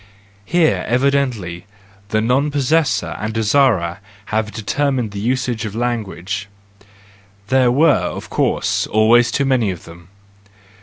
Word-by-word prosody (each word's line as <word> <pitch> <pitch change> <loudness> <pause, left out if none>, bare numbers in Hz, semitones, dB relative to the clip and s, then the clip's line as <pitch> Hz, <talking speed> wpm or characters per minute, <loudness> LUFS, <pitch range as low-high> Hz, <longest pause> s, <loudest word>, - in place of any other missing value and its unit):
Here, 170 - +2
evidently, 120 -9 0 0.4
the 110 0 +1
non 130 +6 +1
possessors 145 +2 0
and 105 +1 -3
desirers 110 -6 +2 0.3
have 110 0 -2
determined 125 +1 -1
the 100 - -6
usage 120 0 -1
of 105 -1 -5
language,—there 100 +1 -4
were, 150 +6 +4
of - - -7
course, - - 0
always 115 +2 +4
too 140 - 0
many 130 -6 +2
of 90 -3 -6
them. 85 0 -14
110 Hz, 115 wpm, -18 LUFS, 100-130 Hz, 0.4 s, were